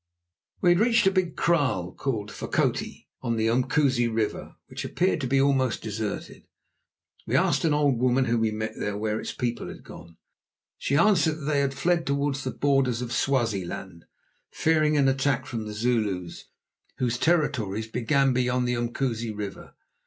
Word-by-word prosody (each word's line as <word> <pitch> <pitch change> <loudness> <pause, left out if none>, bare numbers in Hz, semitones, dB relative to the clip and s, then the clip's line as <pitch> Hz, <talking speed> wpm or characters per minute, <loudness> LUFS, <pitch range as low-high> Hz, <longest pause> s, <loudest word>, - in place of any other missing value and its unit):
We 180 - +4
had 175 0 +4
reached 230 0 +3
a 190 - +5
big 185 -4 0
kraal 130 - +1
called 110 -7 -3
Fokoti, - - -2
on 115 - -1
the 110 0 0
Umkusi 130 +1 +2
River, 110 -2 -2
which - - -7
appeared 180 -3 0
to 130 - -1
be 135 +2 +2
almost 135 -3 +1
deserted. 110 -1 -5 0.8
We - - 0
asked - - +2
an 155 - +3
old 140 -5 +2
woman 130 +1 +2
whom 115 -1 +1
we 110 - +2
met 110 0 -4 0.2
where 110 +1 -1
its - - -5
people 120 -1 -3
had - - -10
gone. 85 0 -13 0.6
She 140 - 0
answered 170 -4 +4
that - - -6
they 145 -1 +1
had 140 -1 0
fled 170 +4 +1
towards 140 0 0
the 130 - -2
borders 130 -4 +1
of 120 - -6
Swaziland, 100 -9 -2 0.4
fearing 155 -1 +2
an 140 -2 +4
attack 135 -1 +1
from 115 -4 -5
the 105 - -6
Zulus, 105 -6 -1 0.5
whose 125 -1 -1
territories 120 - +1
began 130 +4 +1
beyond 125 0 +1
this 120 -1 0
Umkusi 120 -1 -2
River. 105 -2 -7
125 Hz, 165 wpm, -26 LUFS, 110-145 Hz, 0.8 s, a